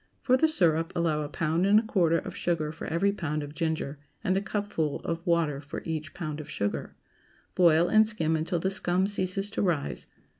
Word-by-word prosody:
For 255 - +4
the 290 +5 +4
syrup, 165 - +2
allow 160 -3 +1
a 145 - -4
pound 165 +4 0
and 205 +1 +6
a - - -3
quarter 175 -7 +2
of - - -6
sugar 160 -3 -1
for 160 - -7
every 185 +5 +1
pound 155 -6 -3
of 145 0 -8
ginger, 160 -3 -2 0.2
and 185 - +1
a 195 - +1
cupful 200 -8 -2
of 165 0 -3
water 160 -5 +1
for 145 - -7
each 155 -2 -4
pound 155 -4 -4
of 155 - -8
sugar. 100 0 -3 0.6
Boil, 170 -1 +5
and 215 +2 +5
skim 160 -8 0
until 160 +3 -1
the 190 +3 -1
scum 185 -1 +1
ceases 195 0 -1
to - - -2
rise. 165 -7 -1
170 Hz, 200 wpm, -28 LUFS, 155-190 Hz, 0.6 s, and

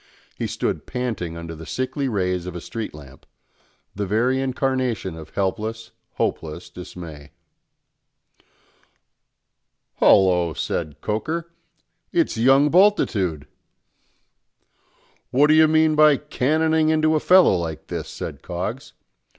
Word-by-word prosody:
He - - -3
stood - - -3
panting 110 -10 -4
under 85 0 -7
the 80 0 -10
sickly 130 +1 -2
rays 90 -4 -1
of 90 - -6
a - - -4
street 115 +5 -6
lamp, 70 -2 -14 0.7
the 100 0 -3
very 125 +6 +1
incarnation 130 -7 -1
of 80 -1 -12
helpless, 110 +4 -3 0.2
hopeless 80 +2 -3
dismay. 85 -5 -10 2.7
"Hallo!" 90 -4 +4
said 75 -4 -3
Coker, 160 +11 -3 0.6
"it's 335 -3 +1
young 135 +5 +4
Bultitude!" 110 - +2 1.8
"What 140 +4 +4
do 150 - +4
you 155 0 +6
mean 155 0 +3
by 150 -2 +5
cannoning 160 +5 +1
into 155 0 +2
a 155 - +2
fellow 180 - +5
like 80 -3 -4
this?" - - -5
said - - -7
Coggs. - - -5
115 Hz, 115 wpm, -22 LUFS, -, 2.7 s, you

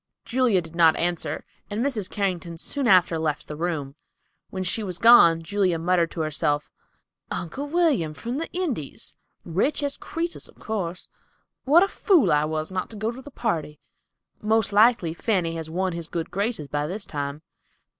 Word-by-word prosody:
Julia 235 -7 +2
did 165 0 -12
not 165 -2 +5
answer, 175 -1 -1 0.2
and 215 +5 -1
Mrs. 220 -9 -1
Carrington 180 -4 -2
soon 275 - -1
after 180 -5 +4
left 150 -2 -2
the 150 - -6
room. 155 -4 -3 0.6
When 185 -1 -4
she 185 +5 0
was 185 -4 -4
gone, 170 -8 +7
Julia 185 0 +1
muttered 170 0 +2
to 165 - -4
herself, 150 -1 0 0.6
"Uncle 265 - -4
William, 290 - +1
from 235 - -4
the 325 - -4
Indies; 290 - -4 0.3
rich 230 - 0
as 285 0 -1
Crœsus, 335 +1 -4
of - - -19
course. 185 -5 -4 0.6
What 315 +7 +6
a - - +2
fool 340 - +3
I 150 0 +3
was 155 +2 -3
not 185 0 -3
to 225 - -8
go 215 +2 -2
to 250 +2 -9
the 290 - -11
party. 160 - -3 0.6
Most 215 -1 +1
likely 210 -6 +4
Fanny 180 -3 0
has 160 -1 -5
won 185 +2 -1
his 170 -1 -4
good 165 -1 -4
graces 200 -4 -2
by 145 +1 -2
this 195 +4 -5
time. 145 +1 -5
185 Hz, 175 wpm, -25 LUFS, 165-230 Hz, 0.6 s, gone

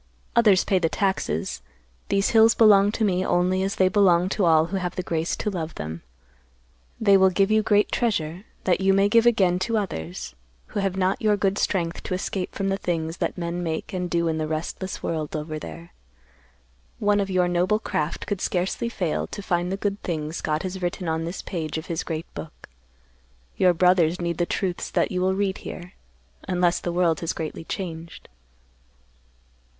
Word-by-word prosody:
"Others 210 -5 +5
pay 190 - +2
the 165 -2 +1
taxes; 190 - -1 0.5
these 195 0 +2
hills 225 0 +6
belong 205 -2 +6
to 220 - +1
me 185 -2 +1
only 185 +1 +1
as 195 +1 -1
they 185 - +4
belong 185 -2 +4
to 195 -1 +1
all 160 -1 +5
who - - +1
have 180 -2 -3
the 185 - -3
grace 165 -1 -1
to 210 - -2
love 165 -4 -4
them. 80 +2 -6 1.0
They 200 -3 +5
will 190 0 +5
give 195 +2 +2
you 215 0 +4
great 210 -1 +2
treasure, 185 - -1 0.2
that 185 0 +1
you 195 0 +4
may 195 +1 +4
give 230 +2 +5
again 185 -6 +3
to 225 +4 0
others, 85 - -4 0.4
who - - -3
have 195 -1 -1
not 190 0 +1
your 210 -1 +3
good 200 0 0
strength 170 -3 -1
to 185 - -3
escape 185 0 -4
from 195 0 -1
the 195 - 0
things 165 -2 -2
that - - -2
men 170 0 -3
make 160 0 -4
and 180 -1 -2
do 170 -1 +1
in 160 -1 -1
the 155 - -1
restless 160 +4 -4
world 155 -2 -3
over 155 0 -4
there. 170 +2 -10 1.0
One 205 0 +2
of 195 -1 -1
your 180 -1 +2
noble 180 +4 +2
craft 155 -7 -3
could 200 -2 -3
scarcely 185 +6 -1
fail 180 -8 -2
to 205 - -7
find 175 0 0
the 195 - -1
good 200 0 -2
things 155 -2 -3
God 155 +2 -1
has 185 0 -5
written 175 0 -3
on 160 0 -1
this 170 +3 -5
page 160 -4 -4
of 160 - -5
His 170 -3 -2
great 160 -1 -4
book. 155 - -9 0.9
Your 180 -2 +4
brothers 180 -1 +3
need 170 -1 -2
the 175 - +1
truths 185 -3 -2
that - - 0
you 180 -1 -1
will 190 +1 +2
read 195 -1 -1
here; 180 0 -8 0.5
unless 175 -1 +2
the 175 - -3
world 170 -2 +2
has 165 - -2
greatly 160 0 -5
changed." 170 -4 -6
180 Hz, 195 wpm, -24 LUFS, 165-195 Hz, 1.0 s, hills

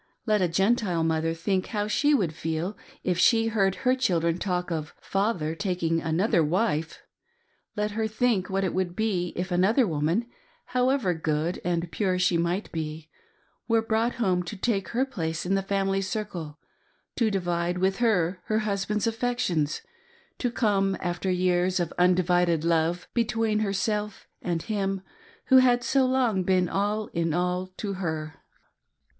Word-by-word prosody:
Let 215 -3 +2
a 180 - +3
Gentile 190 -1 +1
mother 160 0 0
think 185 +3 -1
how 210 -1 -2
she 290 +7 +3
would 180 - 0
feel 160 +5 -3 0.3
if 180 -1 0
she 225 +1 +4
heard 195 -4 +1
her 255 - +5
children 170 -9 +1
talk 180 -2 -2
of 155 -2 -4
" - - -32
Father 195 -6 -1
taking 165 -2 -1
another 165 +2 +2
wife 160 -1 -1 0.3
!" 470 0 -44
Let 210 0 0
her 220 +1 -1
think 220 -3 0
what 195 0 0
it 190 - -1
would 180 -1 -1
be 190 -5 0
if 180 +1 -3
another 200 +9 +3
woman 165 +6 0 0.2
— - - -36
however 250 -6 +2
good 160 +1 -1
and 170 -1 -1
pure 190 -3 0
she 180 -1 +2
might 170 +4 -1
be 155 -1 -5 0.3
— 410 - -41
were 225 -1 +3
brought 225 +2 0
home 185 -7 +1
to 180 +4 -7
take 195 -3 0
her 250 +6 0
place 165 -11 -3
in 185 - 0
the 195 - +2
family 195 0 0
circle, 185 -6 -4 0.6
to 230 -3 +3
divide 175 -2 -1
with 190 +1 +1
her 185 -7 +1
her 215 - 0
husband's 210 0 -1
affections, 225 -10 -1 0.6
to 245 - 0
come, 200 -5 +1
after 175 +1 -2
years 180 0 +1
of 170 -2 -2
undivided 180 -2 +3
love, 170 +1 +1
between 225 -2 +1
herself 210 0 -2
and 170 -2 -2
him 195 -3 -2 0.5
who 260 - +8
had 245 -1 +5
so 265 0 +3
long 250 -7 +2
been 185 0 +2
all 205 +4 -1
in 165 -1 0
all 180 +1 0
to 200 -2 -3
her 160 -4 -3
190 Hz, 165 wpm, -26 LUFS, 170-215 Hz, 0.6 s, who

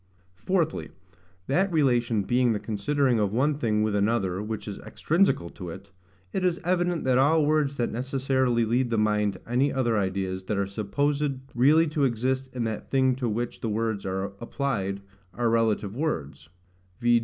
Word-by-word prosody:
Fourthly, 170 - -1 0.6
That 190 +8 +1
relation 120 -8 +2
being 120 +2 +2
the 105 - -2
considering 120 +4 0
of 100 -2 +1
one 135 +7 +2
thing 105 -4 +1
with 110 -1 0
another 100 -3 +1
which 110 0 -5
is 100 - -6
extrinsical 165 - 0
to 90 -3 -7
it, 100 +3 -10 0.4
it 190 - -1
is 180 -1 +1
evident 175 -1 0
that 130 -1 +3
all 150 +3 +4
words 150 -2 +1
that 120 -3 -1
necessarily 130 -1 0
lead 120 +3 +1
the 115 - 0
mind 105 -1 +2
to 95 - -15
any 125 +4 +2
other 120 -5 +1
ideas 95 -1 -2
than 105 +1 -2
are 100 - +1
supposed 140 +9 -1 0.2
really 145 +7 +5
to 150 -1 0
exist 130 +2 -1
in 120 - -1
that 110 -1 -4
thing 130 -1 +3
to 125 -3 -1
which 120 +3 -3
the 115 - -2
words 110 -1 -1
are 95 0 -2 0.2
applied 110 -7 -2 0.3
are 120 -1 +1
relative 110 -3 +1
words: 80 - -3 0.5
v. 120 0 +4
120 Hz, 175 wpm, -26 LUFS, 105-140 Hz, 0.6 s, really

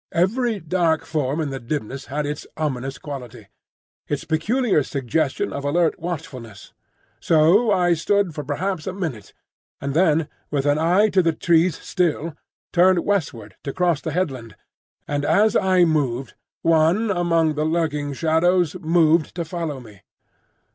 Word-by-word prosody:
Every 220 +6 +1
dark 165 -1 0
form 150 -1 -1
in 150 -3 -2
the 135 - -4
dimness 130 +1 -5
had 150 +2 -2
its 145 0 -5
ominous 135 -3 -3
quality, 135 -6 -9 0.6
its 145 -1 -2
peculiar 200 - +1
suggestion 135 +2 -2
of 140 - -5
alert 165 +4 +1
watchfulness. 130 - -7 0.5
So 170 +9 +4
I 180 -3 +3
stood 195 +2 +1
for 150 - -5
perhaps 165 +5 -3
a 190 - -2
minute, 155 - -5 0.5
and 140 0 -3
then, 160 -2 +3 0.2
with 140 -2 -1
an 145 +1 +2
eye 180 +7 +3
to 190 -2 +3
the 165 -2 +1
trees 165 +1 +2
still, 165 -3 -1 0.4
turned 180 0 +4
westward 120 - -2
to 140 - -4
cross 175 -5 +1
the 160 - -4
headland; 135 - -3 0.5
and 145 -1 -2
as 215 +7 +3
I 185 -3 +4
moved, 135 -6 -1 0.3
one 165 +7 +3
among 165 -3 +1
the 150 0 -1
lurking 155 -3 -1
shadows 165 +3 +2
moved 165 -2 +2
to 170 -2 -3
follow 160 -4 -4
me. 105 -6 -15
160 Hz, 145 wpm, -22 LUFS, 145-175 Hz, 0.6 s, So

